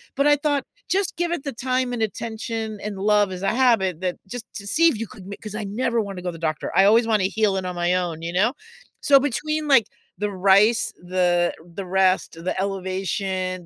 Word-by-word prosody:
but 280 Hz, +1 st, +2 dB
I 295 Hz, -, +6 dB
thought, 290 Hz, -1 st, -1 dB, 0.2 s
"Just 390 Hz, -1 st, 0 dB
give 345 Hz, 0 st, -1 dB
it 345 Hz, -5 st, -2 dB
the 280 Hz, -, -3 dB
time 255 Hz, +1 st, -1 dB
and 230 Hz, -2 st, -1 dB
attention 220 Hz, 0 st, -4 dB
and 210 Hz, -2 st, -4 dB
love 205 Hz, 0 st, +3 dB
as 185 Hz, -1 st, -6 dB
a -, -, +2 dB
habit 210 Hz, -10 st, +2 dB
that 180 Hz, -1 st, -2 dB
just 245 Hz, +3 st, -6 dB
to 200 Hz, -4 st, -7 dB
see 330 Hz, +9 st, +4 dB
if 255 Hz, -, -2 dB
you 230 Hz, -, -3 dB
could 190 Hz, -, -13 dB
make" 200 Hz, +3 st, -9 dB
'Cause 215 Hz, -2 st, -7 dB
I 215 Hz, -, -3 dB
never 230 Hz, +3 st, -1 dB
wanna 195 Hz, -3 st, -6 dB
go 180 Hz, -, -6 dB
to -, -, -5 dB
the 165 Hz, -, -10 dB
doctor. 155 Hz, -, -5 dB
I 195 Hz, -, +7 dB
always 225 Hz, +3 st, +5 dB
wanna 215 Hz, -4 st, +2 dB
heal 210 Hz, -3 st, +3 dB
it 190 Hz, -, -3 dB
on 180 Hz, -1 st, -4 dB
my 175 Hz, 0 st, +1 dB
own, 175 Hz, -3 st, -2 dB
you 170 Hz, +1 st, -4 dB
know? 205 Hz, +7 st, +3 dB, 0.5 s
So 280 Hz, -, +6 dB
between 300 Hz, +3 st, -2 dB
like 265 Hz, -7 st, +5 dB, 0.3 s
the 210 Hz, 0 st, -1 dB
RICE, 200 Hz, +3 st, +3 dB
the 175 Hz, -1 st, +1 dB, 0.2 s
the 195 Hz, -, -5 dB
rest, 185 Hz, -1 st, +1 dB
the 185 Hz, -, -1 dB
elevation 190 Hz, -1 st, -3 dB
205 Hz, 225 wpm, -23 LUFS, 185-240 Hz, 0.5 s, I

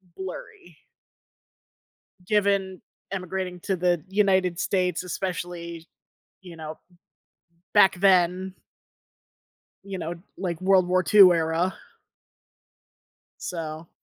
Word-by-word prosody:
blurry 180 Hz, -3 st, -9 dB, 1.5 s
given 200 Hz, -2 st, +1 dB, 0.3 s
immigrating 185 Hz, -1 st, -4 dB
to 190 Hz, +2 st, -1 dB
the 175 Hz, -2 st, +1 dB
United 190 Hz, -3 st, +2 dB
States, 180 Hz, -3 st, 0 dB
especially, 175 Hz, -2 st, -5 dB, 0.5 s
you 180 Hz, -3 st, -12 dB
know, 155 Hz, -1 st, -8 dB, 1.0 s
back 205 Hz, -3 st, +6 dB
then 185 Hz, 0 st, +3 dB, 1.3 s
you 195 Hz, -1 st, -6 dB
know, 170 Hz, 0 st, -4 dB, 0.2 s
like 175 Hz, -4 st, -3 dB
World 185 Hz, -1 st, +4 dB
War 185 Hz, 0 st, +2 dB
II 200 Hz, -3 st, +8 dB
era. 165 Hz, +2 st, 0 dB, 1.7 s
So 165 Hz, -2 st, -6 dB
180 Hz, 85 wpm, -25 LUFS, 170-190 Hz, 1.7 s, II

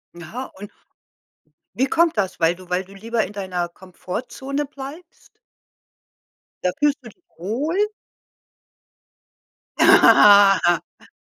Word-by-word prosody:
Aha, 175 Hz, +10 st, -8 dB
und 205 Hz, +1 st, -11 dB, 1.0 s
wie 260 Hz, +6 st, +1 dB
kommt 330 Hz, 0 st, +1 dB
das? 195 Hz, -3 st, -2 dB
Weil 165 Hz, +1 st, +2 dB
du 185 Hz, 0 st, -15 dB
weil 180 Hz, +1 st, -1 dB
du 195 Hz, +1 st, -17 dB
lieber 225 Hz, +3 st, -2 dB
in 200 Hz, -, -13 dB
deiner 185 Hz, -3 st, -4 dB
Komfortzone 250 Hz, +11 st, -6 dB
bleibst? 285 Hz, +5 st, -12 dB, 1.3 s
Da 180 Hz, -, +1 dB
fühlst 295 Hz, -1 st, +2 dB
du 235 Hz, -, -11 dB
dich 350 Hz, -, -24 dB
wohl? 250 Hz, -, -3 dB, 2.0 s
Ha -, -, +5 dB, 0.2 s
ha 200 Hz, -1 st, +7 dB
ha. 175 Hz, -1 st, -2 dB
205 Hz, 120 wpm, -21 LUFS, 185-270 Hz, 2.0 s, ha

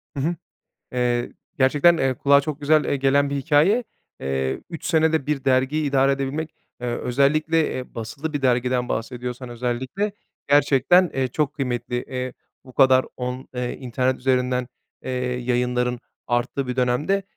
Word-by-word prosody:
Hı -, -, -3 dB
hı. 170 Hz, +2 st, 0 dB, 0.6 s
Eee, 120 Hz, -1 st, 0 dB, 0.3 s
gerçekten, 145 Hz, +6 st, +5 dB
eee, 135 Hz, -4 st, +1 dB
kulağa 140 Hz, +2 st, +4 dB
çok 150 Hz, 0 st, -5 dB
güzel, 155 Hz, +1 st, +3 dB
eee, 140 Hz, -, 0 dB
gelen 140 Hz, +1 st, +2 dB
bir 140 Hz, -, -1 dB
hikâye. 160 Hz, -, +3 dB, 0.4 s
Eee, 65 Hz, 0 st, -2 dB
3 165 Hz, -, -7 dB
senede 160 Hz, -3 st, +2 dB
bir 145 Hz, -2 st, -1 dB
dergiyi 135 Hz, +3 st, +2 dB
idare 135 Hz, 0 st, +3 dB
edebilmek, 140 Hz, +4 st, -3 dB, 0.3 s
eee, 125 Hz, -, -4 dB
özellikle, 155 Hz, +5 st, +2 dB
eee, 130 Hz, 0 st, -6 dB
basılı 130 Hz, +8 st, -5 dB
bir 145 Hz, -2 st, -3 dB
dergiden 125 Hz, 0 st, +1 dB
bahsediyorsan, 125 Hz, +1 st, -4 dB
özellikle 125 Hz, -, -2 dB, 0.4 s
gerçekten, 145 Hz, +5 st, +4 dB
eee, 130 Hz, -1 st, 0 dB
çok 150 Hz, +3 st, -1 dB
kıymetli. 125 Hz, -3 st, -2 dB
Eee, 130 Hz, -1 st, -4 dB, 0.3 s
bu 130 Hz, -, -14 dB
kadar, 130 Hz, -1 st, +5 dB
on 125 Hz, +1 st, -5 dB
ııı, 125 Hz, 0 st, -2 dB
internet 130 Hz, 0 st, -1 dB
üzerinden, 125 Hz, -1 st, 0 dB, 0.3 s
eee, 130 Hz, -, -5 dB, 0.3 s
yayınların 125 Hz, 0 st, 0 dB, 0.3 s
arttığı 120 Hz, +3 st, -1 dB
bir 125 Hz, -, -3 dB
dönemde. 130 Hz, +11 st, +1 dB
130 Hz, 150 wpm, -23 LUFS, 125-145 Hz, 0.6 s, gerçekten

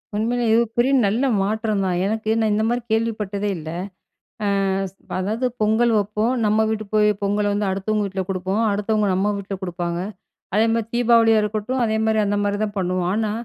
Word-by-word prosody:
உண்மையிலே, 235 Hz, +3 st, 0 dB
இது 230 Hz, +1 st, +5 dB
பெரிய 245 Hz, +3 st, +3 dB
நல்ல 215 Hz, +6 st, +1 dB, 0.2 s
மாற்றம் 215 Hz, 0 st, 0 dB
தான். 180 Hz, -2 st, 0 dB
எனக்கு, 220 Hz, +1 st, -2 dB
நான் 220 Hz, -1 st, +2 dB
இந்த 215 Hz, +1 st, +1 dB
மாரி 240 Hz, +1 st, 0 dB
கேள்விப்பட்டதே 210 Hz, -3 st, -1 dB
இல்ல. 155 Hz, -1 st, -7 dB, 0.8 s
அ, -, -, +1 dB, 0.7 s
அதாவது 215 Hz, +7 st, -1 dB, 0.2 s
பொங்கல் 220 Hz, +2 st, +3 dB
வப்போம், 210 Hz, +4 st, 0 dB
நம்ம 215 Hz, +1 st, +3 dB
வீட்டு 215 Hz, 0 st, -2 dB
போய் 210 Hz, 0 st, +4 dB
பொங்கல 205 Hz, +1 st, +1 dB
வந்து 205 Hz, 0 st, 0 dB
அடுத்தவங்க 210 Hz, +2 st, -1 dB
வீட்ல 195 Hz, -1 st, -3 dB
கொடுப்போம், 190 Hz, +3 st, -1 dB
அடுத்தவங்க 210 Hz, +1 st, 0 dB
நம்ம 200 Hz, +3 st, +1 dB
வீட்ல 200 Hz, 0 st, -5 dB
கொடுப்பாங்க. 175 Hz, -1 st, -3 dB, 0.6 s
அதே 220 Hz, +2 st, +4 dB
மாரி 230 Hz, -1 st, 0 dB
தீபாவளியா 230 Hz, -2 st, +4 dB
இருக்கட்டும், 215 Hz, +5 st, -2 dB
அதே 220 Hz, -1 st, 0 dB
மாரி 220 Hz, 0 st, +2 dB
அந்த 205 Hz, 0 st, 0 dB
மாரி 205 Hz, 0 st, 0 dB
தான் 210 Hz, -1 st, -3 dB
பண்ணுவோம். 180 Hz, -1 st, 0 dB
ஆனா, 215 Hz, 0 st, 0 dB
210 Hz, 175 wpm, -22 LUFS, 200-220 Hz, 0.8 s, இது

